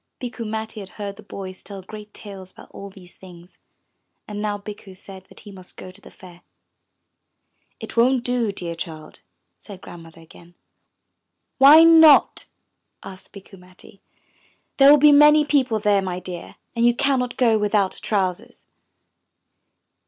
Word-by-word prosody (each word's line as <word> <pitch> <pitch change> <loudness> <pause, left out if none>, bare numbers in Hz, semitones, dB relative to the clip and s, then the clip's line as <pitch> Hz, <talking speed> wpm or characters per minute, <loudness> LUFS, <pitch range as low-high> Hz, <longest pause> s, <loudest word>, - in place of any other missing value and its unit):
Bikku 240 -2 -7
Matti 220 0 -6
had 195 -2 -10
heard 200 -2 -7
the - - -13
boys 190 -2 -10
tell 195 -2 -11
great 210 +2 -12
tales 195 -3 -12
about - - -17
all 200 - -10
these 185 -2 -15
things, 180 -1 -17 0.7
and 210 -1 -7
now 210 -1 -3
Bikku 205 -1 -12
said 190 -1 -13
that - - -16
he 205 - -13
must 185 -2 -13
go 185 - -11
to 195 +2 -21
the - - -15
Fair. 180 -2 -17 1.4
*lt - - -9
won*t 250 +2 +2
do, 245 -3 -1
dear 175 -4 -6
child,'* 160 -2 -10 0.4
said 200 -3 -12
Grandmother 165 -3 -14
again. 170 +2 -19 1.0
'Why 295 +4 +8
not?" 320 -2 +5 0.6
asked 190 -1 -13
Bikku 195 -1 -15
Matti. 185 +2 -17 0.8
'There 275 0 +6
will 295 - +7
be 295 +1 +5
many 295 +1 +5
people 265 -6 0
there, 205 -2 +1
my 180 -1 -5
dear, 180 -1 -10 0.2
and 235 - -1
you 240 0 +3
cannot 260 -3 -2
go 230 -4 +2
without 205 -2 -1
trousers.' 190 -4 -4
205 Hz, 150 wpm, -21 LUFS, 185-240 Hz, 1.4 s, Why